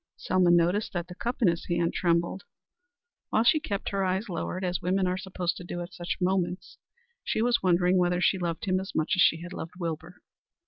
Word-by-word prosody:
Selma 185 Hz, -1 st, +2 dB
noticed 175 Hz, +6 st, +3 dB
that 175 Hz, -2 st, -2 dB
the 180 Hz, -, -9 dB
cup 240 Hz, +6 st, -3 dB
in -, -, +6 dB
his 170 Hz, -1 st, 0 dB
hand 170 Hz, -1 st, 0 dB
trembled. 170 Hz, +2 st, 0 dB, 0.9 s
While 220 Hz, -, +2 dB
she 240 Hz, +7 st, +5 dB
kept 200 Hz, -8 st, -3 dB
her 195 Hz, -1 st, -1 dB
eyes 190 Hz, +4 st, -1 dB
lowered, 180 Hz, +1 st, -3 dB
as 180 Hz, 0 st, -1 dB
women 185 Hz, +2 st, +1 dB
are 180 Hz, 0 st, 0 dB
supposed 185 Hz, -2 st, -3 dB
to -, -, -8 dB
do 175 Hz, 0 st, -5 dB
at 175 Hz, +1 st, -8 dB
such 175 Hz, 0 st, -4 dB
moments, 185 Hz, 0 st, -1 dB, 0.4 s
she -, -, -1 dB
was 240 Hz, 0 st, +2 dB
wondering 180 Hz, 0 st, +3 dB
whether 180 Hz, 0 st, +2 dB
she 185 Hz, +1 st, +2 dB
loved 170 Hz, +3 st, -3 dB
him 185 Hz, -1 st, +1 dB
as 190 Hz, +1 st, -7 dB
much 155 Hz, +6 st, +1 dB
as 185 Hz, -, +2 dB
she 165 Hz, 0 st, +4 dB
had 175 Hz, +1 st, -8 dB
loved 165 Hz, -1 st, -7 dB
Wilbur? 165 Hz, 0 st, -5 dB
180 Hz, 215 wpm, -28 LUFS, 175-190 Hz, 0.9 s, in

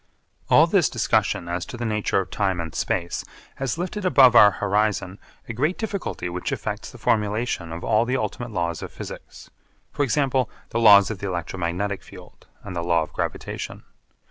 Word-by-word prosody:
All -, -, +7 dB
this -, -, +3 dB
discussion 85 Hz, -, 0 dB
as 85 Hz, 0 st, -2 dB
to 120 Hz, -, -7 dB
the 120 Hz, -, -3 dB
nature 105 Hz, -2 st, 0 dB
of 95 Hz, -, -4 dB
time 95 Hz, -3 st, 0 dB
and 80 Hz, -2 st, -5 dB
space 85 Hz, 0 st, -2 dB, 0.3 s
has 135 Hz, +2 st, -2 dB
lifted 185 Hz, +4 st, -4 dB
above 135 Hz, -9 st, +6 dB
our 105 Hz, -3 st, +9 dB
horizon 100 Hz, -1 st, 0 dB, 0.3 s
a 115 Hz, -, -4 dB
great 150 Hz, +10 st, 0 dB
difficulty 200 Hz, -, -4 dB
which 90 Hz, +1 st, -4 dB
affects -, -, -4 dB
the -, -, -12 dB
formulation 105 Hz, -5 st, -1 dB
of 85 Hz, +2 st, -6 dB
all 110 Hz, +1 st, +2 dB
the 130 Hz, +2 st, 0 dB
ultimate 120 Hz, -1 st, -4 dB
laws 85 Hz, -6 st, -2 dB
of -, -, -7 dB
physics -, -, -10 dB, 0.4 s
for 145 Hz, -, -3 dB
example, 135 Hz, -3 st, +1 dB, 0.2 s
the 115 Hz, -, -1 dB
laws 105 Hz, -2 st, +7 dB
of 105 Hz, -, -6 dB
the 100 Hz, -, -4 dB
electromagnetic 90 Hz, +2 st, -3 dB
field, -, -, -15 dB, 0.2 s
and 95 Hz, -3 st, -7 dB
the 85 Hz, -, -1 dB
law 85 Hz, -1 st, +2 dB
of -, -, -11 dB
gravitation. -, -, -4 dB
105 Hz, 180 wpm, -24 LUFS, 90-125 Hz, 0.4 s, our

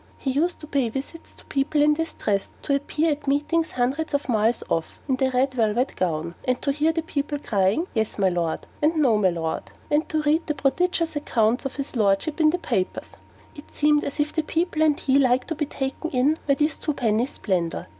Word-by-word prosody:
He 270 Hz, -, -2 dB
used 330 Hz, +6 st, 0 dB
to -, -, -7 dB
pay 275 Hz, -5 st, 0 dB
visits 275 Hz, +7 st, -7 dB
to -, -, -15 dB
people 280 Hz, +2 st, 0 dB
in 300 Hz, +1 st, +5 dB
this 325 Hz, +2 st, -3 dB
dress; 200 Hz, -2 st, -2 dB
to 280 Hz, -, 0 dB
appear 300 Hz, +3 st, +1 dB
at 290 Hz, 0 st, -4 dB
meetings 300 Hz, +4 st, +1 dB
hundreds 275 Hz, +5 st, 0 dB
of 285 Hz, -, -2 dB
miles 225 Hz, -1 st, +2 dB
off, 165 Hz, -1 st, -2 dB
in 260 Hz, -2 st, +1 dB
the 265 Hz, 0 st, +2 dB
red 260 Hz, +1 st, +1 dB
velvet 235 Hz, +2 st, +1 dB
gown. 170 Hz, -1 st, -1 dB
And 255 Hz, -1 st, 0 dB
to 280 Hz, -, +2 dB
hear 305 Hz, +3 st, +2 dB
the 325 Hz, 0 st, -2 dB
people 290 Hz, -2 st, -2 dB
crying 205 Hz, -, +1 dB
'Yes, 220 Hz, -2 st, -1 dB
me 190 Hz, -2 st, +2 dB
Lard!' 170 Hz, -2 st, -2 dB, 0.2 s
and 310 Hz, +3 st, +3 dB
'No, 255 Hz, -9 st, +3 dB
me 190 Hz, -3 st, +4 dB
Lard!' 165 Hz, -2 st, -3 dB, 0.2 s
and 300 Hz, +4 st, +2 dB
to 310 Hz, -3 st, 0 dB
read 310 Hz, +3 st, +2 dB
the 300 Hz, -, -1 dB
prodigious 325 Hz, +3 st, 0 dB
accounts 240 Hz, -4 st, +1 dB
of 270 Hz, -, -11 dB
his 275 Hz, -1 st, -2 dB
Lordship 215 Hz, -, +1 dB
in 310 Hz, -, +6 dB
the 345 Hz, -, +1 dB
papers: 215 Hz, -, -2 dB, 0.4 s
it 290 Hz, -, -13 dB
seemed 295 Hz, 0 st, +3 dB
as 280 Hz, -, -5 dB
if 295 Hz, +1 st, 0 dB
the 320 Hz, -, +1 dB
people 320 Hz, 0 st, -1 dB
and 305 Hz, -2 st, +3 dB
he 275 Hz, 0 st, +3 dB
liked 255 Hz, 0 st, +2 dB
to -, -, 0 dB
be 300 Hz, -2 st, -2 dB
taken 270 Hz, +4 st, -4 dB
in 270 Hz, +3 st, +2 dB
by 280 Hz, -, +4 dB
this 300 Hz, +2 st, 0 dB
twopenny 245 Hz, -6 st, 0 dB
splendour. 175 Hz, -, -1 dB
280 Hz, 215 wpm, -24 LUFS, 230-305 Hz, 0.4 s, in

